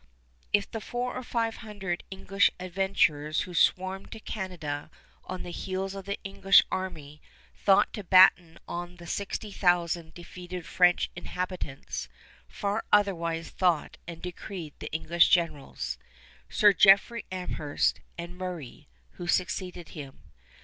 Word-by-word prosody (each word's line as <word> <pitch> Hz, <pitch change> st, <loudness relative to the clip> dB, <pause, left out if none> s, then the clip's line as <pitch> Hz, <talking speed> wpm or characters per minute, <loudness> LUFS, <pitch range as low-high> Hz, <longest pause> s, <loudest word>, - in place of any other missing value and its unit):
If 205 Hz, -1 st, +2 dB
the 225 Hz, -, -4 dB
four 245 Hz, +2 st, -3 dB
or 255 Hz, -, -3 dB
five 230 Hz, -2 st, -1 dB
hundred 200 Hz, -6 st, -4 dB
English 195 Hz, +1 st, +2 dB
adventurers 175 Hz, -5 st, +1 dB
who 180 Hz, -, -6 dB
swarmed 185 Hz, +3 st, +1 dB
to 225 Hz, -, -8 dB
Canada 170 Hz, -10 st, -5 dB, 0.4 s
on 185 Hz, -, -5 dB
the 175 Hz, -, -7 dB
heels 190 Hz, +2 st, -3 dB
of 195 Hz, -1 st, -7 dB
the 200 Hz, 0 st, -3 dB
English 195 Hz, 0 st, +5 dB
army 155 Hz, -6 st, -5 dB, 0.3 s
thought 200 Hz, +1 st, +4 dB
to 210 Hz, -, -5 dB
batten 180 Hz, -2 st, +6 dB
on 175 Hz, +1 st, -5 dB
the 175 Hz, -1 st, -12 dB
sixty 200 Hz, +4 st, -4 dB
thousand 175 Hz, -3 st, +1 dB
defeated 180 Hz, 0 st, -8 dB
French 180 Hz, -1 st, +3 dB
inhabitants, 180 Hz, -5 st, -5 dB, 0.4 s
far 205 Hz, -, -2 dB
otherwise 170 Hz, -5 st, +2 dB
thought 175 Hz, -4 st, +1 dB
and 170 Hz, -1 st, -8 dB
decreed 180 Hz, -3 st, -6 dB
the -, -, -7 dB
English 165 Hz, +2 st, +3 dB
generals, 160 Hz, -5 st, 0 dB, 0.5 s
Sir 205 Hz, -1 st, +5 dB
Jeffrey 200 Hz, +5 st, +5 dB
Amherst, 180 Hz, -5 st, -1 dB, 0.2 s
and 170 Hz, +1 st, -7 dB
Murray, 180 Hz, -8 st, -7 dB, 0.3 s
who 175 Hz, -, -6 dB
succeeded 180 Hz, -1 st, -1 dB
him. 140 Hz, -4 st, -10 dB
180 Hz, 130 wpm, -28 LUFS, 170-195 Hz, 0.5 s, batten